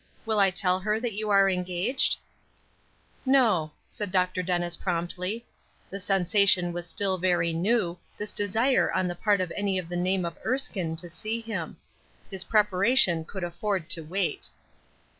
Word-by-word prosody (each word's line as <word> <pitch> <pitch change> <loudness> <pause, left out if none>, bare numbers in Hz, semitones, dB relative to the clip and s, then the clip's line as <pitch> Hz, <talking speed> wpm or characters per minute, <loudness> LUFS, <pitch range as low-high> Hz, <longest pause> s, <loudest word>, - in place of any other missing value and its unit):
Will 220 -1 +1
I 195 -1 +6
tell 185 0 +1
her 210 +3 0
that 235 -1 -3
you 215 +1 -3
are 195 -1 +5
engaged?" 185 +8 +1 1.1
"No," 225 - +3 0.2
said 205 -3 -5
Dr. 185 -1 +1
Dennis, 175 -1 -1
promptly. 180 +6 -3 0.5
The 195 - -5
sensation 190 -1 +3
was 175 0 -4
still 190 +1 0
very 170 -2 +1
new, 180 0 0 0.2
this 210 0 -4
desire 220 +6 +2
on 185 - 0
the 175 - -2
part 200 +2 +1
of 180 -2 -3
any 200 -2 0
of 175 -2 -4
the 175 - -4
name 185 +1 0
of 170 -1 -6
Erskine 195 -11 -1
to 175 +2 0
see 215 +7 -3
him. 225 -2 -5 0.5
His 190 -1 -3
preparation 200 -4 +3
could 190 +2 -7
afford 175 0 -2
to 165 - -1
wait. 195 - -2
185 Hz, 160 wpm, -27 LUFS, 175-210 Hz, 1.1 s, I